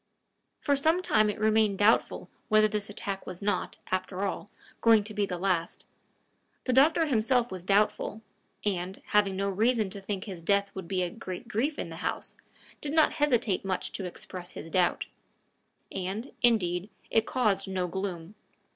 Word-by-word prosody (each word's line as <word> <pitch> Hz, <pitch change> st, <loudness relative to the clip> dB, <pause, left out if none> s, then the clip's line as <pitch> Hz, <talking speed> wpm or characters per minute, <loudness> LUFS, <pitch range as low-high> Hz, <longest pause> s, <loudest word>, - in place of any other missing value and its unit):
For 285 Hz, -, +2 dB
some 320 Hz, +6 st, +2 dB
time 215 Hz, -9 st, +3 dB
it 210 Hz, -, -3 dB
remained 215 Hz, -2 st, +3 dB
doubtful 210 Hz, +3 st, +2 dB, 0.2 s
whether 215 Hz, -1 st, +5 dB
this 210 Hz, -1 st, -2 dB
attack 200 Hz, -2 st, -5 dB
was 180 Hz, -, -6 dB
not, 200 Hz, -2 st, -1 dB, 0.2 s
after 185 Hz, +1 st, -1 dB
all, 200 Hz, +1 st, -4 dB, 0.3 s
going 225 Hz, -2 st, +6 dB
to 215 Hz, +1 st, -6 dB
be 205 Hz, -1 st, 0 dB
the 180 Hz, -, -3 dB
last: 175 Hz, -2 st, -1 dB, 0.8 s
the 255 Hz, -, 0 dB
doctor 315 Hz, +6 st, +5 dB
himself 245 Hz, -2 st, +2 dB
was 185 Hz, -2 st, -6 dB
doubtful, 210 Hz, +2 st, +1 dB, 0.4 s
and, 190 Hz, -1 st, -2 dB
having 205 Hz, -2 st, +3 dB
no 195 Hz, +1 st, -1 dB
reason 215 Hz, +1 st, +1 dB
to 200 Hz, -, -4 dB
think 195 Hz, -1 st, -3 dB
his 185 Hz, -5 st, -7 dB
death 200 Hz, +3 st, +2 dB
would 190 Hz, -3 st, -7 dB
be 185 Hz, -1 st, 0 dB
a 175 Hz, -, -2 dB
great 190 Hz, +1 st, -7 dB
grief 250 Hz, +7 st, -1 dB
in -, -, -4 dB
the -, -, -8 dB
house, -, -, -3 dB, 0.5 s
did 290 Hz, 0 st, -3 dB
not 315 Hz, -1 st, +4 dB
hesitate 240 Hz, -10 st, +2 dB
much 190 Hz, -1 st, -2 dB
to 195 Hz, -, -5 dB
express 180 Hz, 0 st, -8 dB
his 165 Hz, -, -8 dB
doubt. 180 Hz, -2 st, +2 dB, 0.9 s
And, 195 Hz, +7 st, -4 dB
indeed, 195 Hz, -6 st, +2 dB, 0.2 s
it 225 Hz, 0 st, +3 dB
caused 205 Hz, -6 st, +1 dB
no 185 Hz, -1 st, -1 dB
gloom. 180 Hz, -1 st, -4 dB
200 Hz, 170 wpm, -29 LUFS, 185-225 Hz, 0.9 s, going